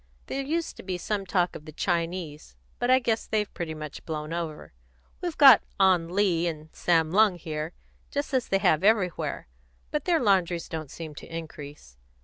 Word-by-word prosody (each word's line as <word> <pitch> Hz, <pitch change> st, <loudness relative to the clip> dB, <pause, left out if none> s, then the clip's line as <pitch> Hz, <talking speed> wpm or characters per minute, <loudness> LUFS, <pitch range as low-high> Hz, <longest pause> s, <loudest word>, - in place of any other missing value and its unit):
There 275 Hz, -, -3 dB
used 325 Hz, +4 st, -2 dB
to -, -, -8 dB
be 185 Hz, -1 st, -3 dB
some 195 Hz, +1 st, -3 dB
talk 180 Hz, -1 st, +1 dB
of 150 Hz, -, -9 dB
the 155 Hz, -, -9 dB
Chinese, 170 Hz, -2 st, -3 dB, 0.2 s
but 245 Hz, -, 0 dB
I 255 Hz, -, +7 dB
guess 235 Hz, -3 st, -1 dB
they've 210 Hz, -2 st, -1 dB
pretty 160 Hz, -2 st, -4 dB
much 155 Hz, -2 st, -8 dB
blown 155 Hz, 0 st, -4 dB
over. 165 Hz, -, -5 dB, 0.5 s
We've 350 Hz, -3 st, -3 dB
got 270 Hz, -6 st, +9 dB, 0.2 s
Ah 190 Hz, -2 st, +6 dB
Lee 175 Hz, 0 st, +1 dB
and 155 Hz, -1 st, -6 dB
Sam 165 Hz, -2 st, +2 dB
Lung 205 Hz, 0 st, +5 dB
here, 160 Hz, -1 st, -5 dB, 0.4 s
just 285 Hz, 0 st, -3 dB
as 255 Hz, -2 st, +1 dB
they 195 Hz, -, +2 dB
have 160 Hz, -3 st, +2 dB
everywhere, 200 Hz, -, +1 dB, 0.4 s
but 300 Hz, -2 st, -2 dB
their 345 Hz, -3 st, +3 dB
laundries 185 Hz, -6 st, +2 dB
don't 155 Hz, -3 st, -5 dB
seem 160 Hz, 0 st, -8 dB
to -, -, -10 dB
increase. 150 Hz, -, -9 dB
175 Hz, 180 wpm, -27 LUFS, 160-210 Hz, 0.5 s, got